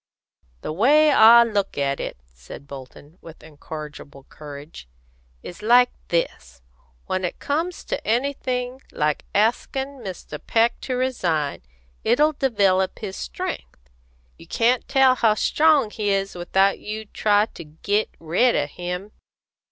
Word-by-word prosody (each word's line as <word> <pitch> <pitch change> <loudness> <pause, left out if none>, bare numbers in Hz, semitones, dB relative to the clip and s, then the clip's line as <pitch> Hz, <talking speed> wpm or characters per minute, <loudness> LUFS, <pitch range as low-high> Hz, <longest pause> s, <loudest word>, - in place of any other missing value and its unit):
"The - - -4
way 295 - +5
I 235 -1 +8
look 205 -4 -2
at 140 -1 -1
it," - - -5
said 60 - -13
Bolton, 140 +4 -12
with 165 -1 -13
incorrigible 150 -2 -10
courage, 145 - -11 0.5
"is 175 +3 -9
like 245 +3 +5 0.2
this: 65 - -3 0.4
When 185 0 -2
it 180 - -3
comes 330 +5 -2
to - - -4
anything 250 +1 -2
like 150 0 -1
askin' 265 +6 0
Mr. 185 -8 -8
Peck 230 +1 +1
to 255 - -3
resign, 175 - -1 0.4
it'll 295 +7 +3
develop 200 -9 +1
his 195 -4 -6
strength. - - -7 0.5
You - - -14
can't 240 +2 +1
tell 270 -2 +5
how 225 -4 +2
strong 295 -2 +3
he 210 -1 -2
is 195 0 0
without 190 +3 +1
you 215 +1 -6
try 205 0 +2
to - - -9
git 200 +8 -2
red 180 +10 +2
of 145 0 -1
him. 180 +3 -5
205 Hz, 135 wpm, -23 LUFS, 155-245 Hz, 0.5 s, I